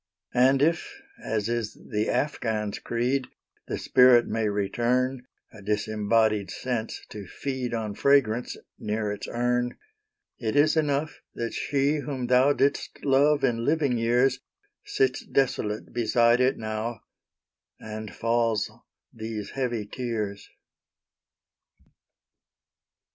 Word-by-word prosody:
And 130 +2 +4
if, 165 +2 0 0.2
as 110 -1 -1
is 115 -2 -2
the 105 0 -3
Afghaun's 110 -7 -1
creed, 125 +3 -1 0.4
The - - -3
spirit 125 -2 +5
may 110 -1 0
return,A 120 +3 -2
disembodied 105 0 +1
sense 120 0 -4
to 105 -3 -8
feed, 130 -1 -3
On 110 -2 -3
fragrance, 125 -1 +2 0.2
near 105 0 -2
its 105 0 -5
urn—It 125 - -4
is 150 +2 +4
enough, 145 -3 0
that 115 0 -3
she, 140 +2 +1
whom 135 -4 -4
thouDid'st 135 +3 +2
love 145 +2 +4
in 115 -3 +1
living 145 -2 +1
years, 120 +3 +2 0.4
Sits 130 -1 0
desolate 110 -5 -1
beside 120 +1 +3
it 130 +1 +2
now, 110 +1 -4 0.8
And 110 -1 -7
falls 115 -2 0 0.4
these 110 -2 -6
heavy 120 -5 -2
tears. 105 -3 -4
120 Hz, 105 wpm, -26 LUFS, 110-135 Hz, 0.8 s, spirit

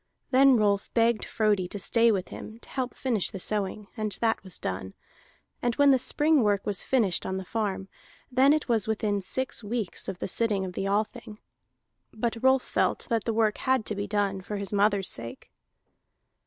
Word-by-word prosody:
Then 265 0 +6
Rolf 205 -2 +1
begged 230 -1 +2
Frodi 210 -4 +1
to 205 - -5
stay 230 +4 +3
with 195 -3 -2
him 220 - -9
to - - -15
help 255 -2 -3
finish 235 -8 -1
the 195 - -7
sowing, 205 +1 -2
and 215 -2 -2
that 225 -3 +1
was 190 -3 -7
done. 95 +1 -5 0.7
And 240 -1 0
when 285 -1 +5
the 260 - +4
spring 300 +3 +3
work 205 -3 +1
was 205 -3 -1
finished 220 -9 +1
on 190 - -3
the 190 - -5
farm, 200 -2 -2 0.4
then 260 +3 +5
it 310 0 +1
was 225 -4 +1
within 210 -2 0
six 260 +4 -1
weeks 215 -3 -3
of 185 - -5
the - - -4
sitting 205 -1 0
of 180 - -6
the 195 - -2
Althing. 215 +2 -2 0.7
But 230 0 -3
Rolf 260 0 +4
felt - - 0
that 225 -1 +1
the 230 - 0
work 220 -1 +1
had 260 -4 +1
to 210 - -3
be 200 +1 -3
done, 200 -2 0
for 205 +2 -5
his 200 +1 -5
mother's 200 -1 +2
sake. 115 -5 -5
215 Hz, 195 wpm, -27 LUFS, 200-235 Hz, 0.7 s, Then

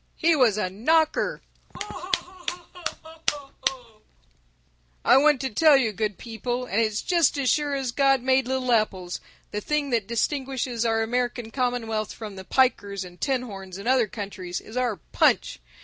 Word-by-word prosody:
He 330 0 +3
was 240 -7 +4
a 210 - 0
knocker! 310 - +1 0.3
(Laughter 375 -2 -3
and 350 -2 -7
applause.) 270 -6 -3 1.0
"I 255 - +7
want 295 0 +5
to 265 - -2
tell 300 +5 +6
you 240 -5 +1
good 210 -1 -2
people, 240 +2 -4
and 225 -1 +1
it's 215 -1 0
just 340 -5 +3
as 270 -3 +2
sure 290 -2 +1
as 265 -3 -2
God 270 0 +3
made 260 -1 +3
little 260 -1 0
apples, 190 -6 0 0.3
the 210 - -3
thing 295 +2 -1
that 225 -5 +1
distinguishes 255 -1 -1
our 225 -1 +2
American 240 0 -2
commonwealth 225 -4 -1
from 215 -3 -8
the 190 - -8
pikers 200 -5 +1
and 180 0 -14
tin 265 -3 +1
horns 195 -5 -8
in 200 - -8
other 250 -2 +3
countries 195 -4 -5
is 220 - -12
our 250 -3 +1
Punch. 165 - +1
245 Hz, 165 wpm, -25 LUFS, 215-275 Hz, 1.0 s, I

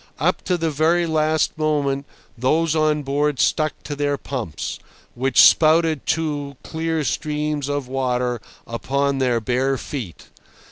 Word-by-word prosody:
Up - - 0
to 180 - +1
the 165 -1 -1
very 165 +4 +2
last 155 -1 +1
moment 145 -3 0 0.3
those 155 +6 +1
on 155 -1 +2
board 145 0 0
stuck 155 +4 +2
to 145 - -5
their 145 0 0
pumps, 120 - -5 0.3
which 130 +1 +1
spouted 160 -2 +5
two 145 -4 -1
clear 160 -1 -2
streams 150 -1 -2
of 145 -2 -2
water 125 -2 -1 0.2
upon 140 +4 -1
their 125 -3 +2
bare 130 +4 0
feet. 120 - -7
145 Hz, 135 wpm, -21 LUFS, 135-155 Hz, 0.3 s, spouted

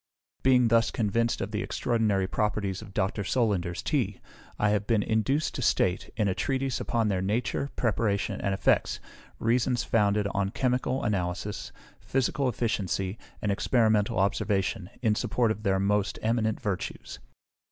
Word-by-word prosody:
Being 125 -2 +4
thus 115 0 +4
convinced 115 +1 0
of 95 +1 -3
the 105 -1 -2
extraordinary 110 -6 0
properties 100 -1 -1
of 105 -3 -10
Dr. 100 +2 -1
Solander's 95 -6 0
Tea, 110 -10 0 0.4
I 105 - +2
have 105 -1 0
been 110 -3 +2
induced 135 +7 0
to 130 - -4
state, 95 -6 +1
in 105 -3 +2
a 95 - +1
Treatise 135 +3 -1
upon 115 -2 0
their 95 -3 0
Nature, 120 +7 -1
Preparation, 105 -4 0
and 100 - 0
Effects, 95 - +1 0.4
reasons 120 +1 +1
founded 105 -2 +2
on 100 -1 0
chemical 125 +3 0
analysis, 95 -1 -2 0.3
physical 135 +1 0
efficiency, 100 -4 -1 0.2
and 105 - +1
experimental 110 -1 +2
observation, 100 0 0
in 110 -3 +4
support 115 +1 +1
of 105 - -4
their 95 -2 +1
most 100 +1 +1
eminent 110 -1 +1
virtues. 100 - -4
105 Hz, 145 wpm, -28 LUFS, 100-115 Hz, 0.4 s, Being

